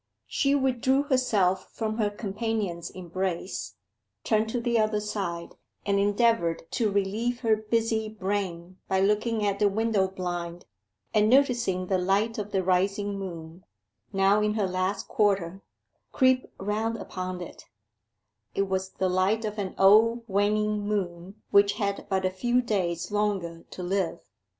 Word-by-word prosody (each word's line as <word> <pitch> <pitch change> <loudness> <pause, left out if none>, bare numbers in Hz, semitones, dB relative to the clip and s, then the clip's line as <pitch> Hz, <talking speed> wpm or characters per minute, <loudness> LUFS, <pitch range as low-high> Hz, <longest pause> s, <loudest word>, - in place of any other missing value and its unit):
She 275 -1 +1
withdrew 265 0 +2
herself 220 -10 +1
from 220 0 -3
her 210 -2 +2
companion's 205 -4 -3
embrace, 180 - -4 0.5
turned 220 0 +1
to 245 - -1
the 235 -1 +1
other 215 -1 +1
side, 190 -5 -4 0.3
and 200 0 +2
endeavoured 205 -4 +2
to 225 -4 +1
relieve 210 +5 -1
her 225 -3 +3
busy 220 0 0
brain 190 -3 -4
by 190 - +1
looking 210 +2 +1
at 200 -1 0
the 210 - +4
window 215 -1 +1
blind, 175 -2 -5 0.5
and 210 0 +4
noticing 240 -8 +3
the 185 0 +1
light 200 +5 +1
of 205 0 -5
the 190 -2 +1
rising 195 +2 +1
moon 170 -2 -8 0.5
now 195 +1 +3
in 210 0 +1
her 210 -3 +1
last 185 +2 -2
quarter 195 -3 +1 0.5
creep 260 -1 +2
round 215 +3 -1
upon 185 -3 -5
it: 175 - -9 0.9
it 195 - +2
was 190 0 -1
the 190 - 0
light 190 +5 +1
of 210 0 -4
an 190 -2 -3
old 225 +4 +5
waning 210 +1 +1
moon 195 -2 -4
which 200 0 +5
had 200 -2 -3
but 190 -1 0
a 185 - +1
few 240 +6 +1
days 185 -6 -1
longer 195 -5 -1
to 180 - -7
live. 185 -1 -1
200 Hz, 145 wpm, -27 LUFS, 185-220 Hz, 0.9 s, old